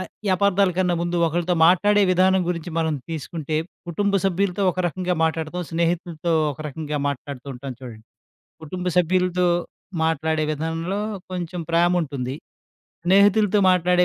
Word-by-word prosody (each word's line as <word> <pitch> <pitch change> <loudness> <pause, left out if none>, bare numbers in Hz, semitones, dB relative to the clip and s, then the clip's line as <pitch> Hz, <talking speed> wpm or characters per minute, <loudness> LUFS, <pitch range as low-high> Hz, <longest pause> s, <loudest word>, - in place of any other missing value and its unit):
అయ్ 185 - -6 0.2
ఈ - - +1
అపార్థాల 200 0 +3
కన్నా 180 -1 +2
ముందు 175 0 -1
ఒకరితో 175 +2 0
మాట్లాడే 205 +4 +4
విధానం 185 +1 +4
గురించి 175 0 -3
మనం 160 -1 +1 0.2
తీసుకుంటే, 155 0 -4 0.3
కుటుంబ 200 +4 0
సభ్యులతో 195 +1 0
ఒక 185 +1 -3
రకంగా 180 +1 -2
మాట్లాడుతాం, 160 +2 -2
స్నేహితులతో 170 0 -1 0.2
ఒక 135 - -15
రకంగా 150 0 -4
మాట్లాడుతూంటాం 135 -1 -6
చూడండి. 115 -4 -10 0.6
కుటుంబ 180 +4 -5
సభ్యులతో 180 +1 +2 0.6
మాట్లాడే 160 0 0
విధానంలో 165 +5 -3 0.3
కొంచెం 180 -1 -4
ప్రేముంటుంది. 160 -7 +1 0.7
స్నేహితులతో 205 +2 +4
మాట్లాడే 180 0 +3
175 Hz, 125 wpm, -23 LUFS, 160-185 Hz, 0.7 s, మాట్లాడే